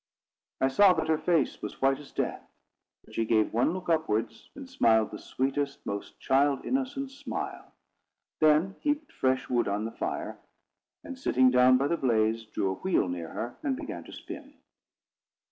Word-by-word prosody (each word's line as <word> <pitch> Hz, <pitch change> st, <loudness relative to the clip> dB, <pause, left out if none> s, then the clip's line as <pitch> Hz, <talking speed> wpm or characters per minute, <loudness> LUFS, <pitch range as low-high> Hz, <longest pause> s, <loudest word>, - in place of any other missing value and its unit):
I 130 Hz, -, +3 dB
saw 190 Hz, +8 st, +6 dB
that 160 Hz, -, -2 dB
her 160 Hz, -, +3 dB
face 160 Hz, -2 st, +1 dB
was -, -, -6 dB
white 135 Hz, 0 st, +2 dB
as 145 Hz, -, -13 dB
death. -, -, -2 dB, 0.6 s
But -, -, -17 dB
she 115 Hz, -, 0 dB
gave 110 Hz, -1 st, +2 dB
one 120 Hz, +7 st, +2 dB
look 185 Hz, +1 st, -6 dB
upwards, 115 Hz, -9 st, -1 dB
and 275 Hz, -1 st, -9 dB
smiled 110 Hz, -, +3 dB
the -, -, -7 dB
sweetest, 140 Hz, +1 st, -2 dB
most 100 Hz, 0 st, -5 dB
child 140 Hz, +1 st, +2 dB
innocent 270 Hz, +1 st, -2 dB
smile; 280 Hz, +1 st, -6 dB, 0.7 s
then 155 Hz, +5 st, +3 dB
heaped 295 Hz, 0 st, -1 dB
fresh 130 Hz, 0 st, 0 dB
wood 120 Hz, -1 st, +1 dB
on 100 Hz, +2 st, -1 dB
the 115 Hz, -, -4 dB
fire, -, -, -4 dB, 0.6 s
and, 275 Hz, -4 st, -8 dB
sitting 130 Hz, -, +4 dB
down 125 Hz, 0 st, +6 dB
by 135 Hz, +2 st, +1 dB
the 170 Hz, -, 0 dB
blaze, 115 Hz, -3 st, +1 dB
drew 95 Hz, -3 st, -1 dB
her -, -, -12 dB
wheel 185 Hz, -, +2 dB
near 85 Hz, -2 st, -4 dB
her, 120 Hz, +2 st, -5 dB
and 275 Hz, -4 st, -1 dB
began 295 Hz, -1 st, -6 dB
to -, -, -12 dB
spin. -, -, -9 dB
135 Hz, 175 wpm, -28 LUFS, 115-185 Hz, 0.7 s, saw